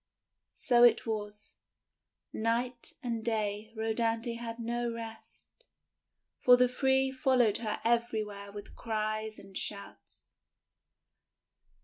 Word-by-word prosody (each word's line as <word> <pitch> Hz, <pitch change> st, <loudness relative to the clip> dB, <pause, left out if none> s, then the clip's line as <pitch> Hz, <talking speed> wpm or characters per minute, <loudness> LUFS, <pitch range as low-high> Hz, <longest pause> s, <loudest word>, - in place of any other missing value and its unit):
So 240 Hz, -1 st, +4 dB
it 235 Hz, +1 st, +6 dB
was, 210 Hz, -2 st, -5 dB, 0.8 s
night 235 Hz, +2 st, -1 dB
and 230 Hz, -2 st, -2 dB
day 215 Hz, -1 st, -2 dB
Rhodanthe 225 Hz, +1 st, 0 dB
had 230 Hz, -1 st, -5 dB
no 235 Hz, 0 st, -2 dB
rest, 225 Hz, -1 st, -9 dB, 0.9 s
for 245 Hz, 0 st, +7 dB
the 250 Hz, 0 st, +5 dB
three 265 Hz, +1 st, +2 dB
followed 255 Hz, -5 st, +3 dB
her 215 Hz, -2 st, -3 dB
everywhere 215 Hz, -4 st, -1 dB
with 205 Hz, 0 st, -10 dB
cries 215 Hz, -1 st, -2 dB
and 195 Hz, -1 st, -14 dB
shouts. 200 Hz, 0 st, -5 dB
230 Hz, 100 wpm, -31 LUFS, 215-240 Hz, 0.9 s, for